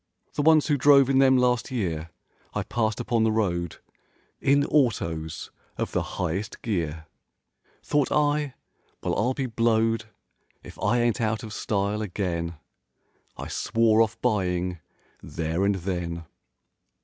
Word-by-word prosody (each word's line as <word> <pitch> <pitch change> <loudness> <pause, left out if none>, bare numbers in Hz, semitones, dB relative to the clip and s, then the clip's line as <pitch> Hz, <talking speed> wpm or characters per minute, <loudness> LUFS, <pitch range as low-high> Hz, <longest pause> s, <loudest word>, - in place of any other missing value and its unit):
The 150 - -1
ones 155 0 +5
who 145 -3 +1
drove 140 -1 +6
in 135 - +4
them 130 -1 +6
last 125 -2 +2
year, 85 -10 -2 0.5
I - - 0
passed 110 -3 -1
upon 115 +1 +1
the 110 - +3
road 85 -6 -1 0.6
In 140 +1 +3
autos 85 - 0 0.3
of - - -2
the - - 0 0.2
highest 95 - -3
gear— 85 - -2 0.8
Thought 145 -2 +1
I, 145 -2 +1 0.5
"Well, - - 0
I'll 125 +5 +1
be 135 - -1
blowed 115 -1 +1 0.6
If - - -12
I 120 - +2
ain't 120 -1 +1
out 110 -1 0
of 110 -1 -7
style 105 0 -1
again!" 90 -4 -3 0.8
I - - -6
swore 115 -1 +2
off 110 0 0
buying 90 -6 0 0.4
there 80 +2 -2
and 100 0 +2
then. 85 -2 -4
110 Hz, 135 wpm, -26 LUFS, 90-125 Hz, 0.8 s, drove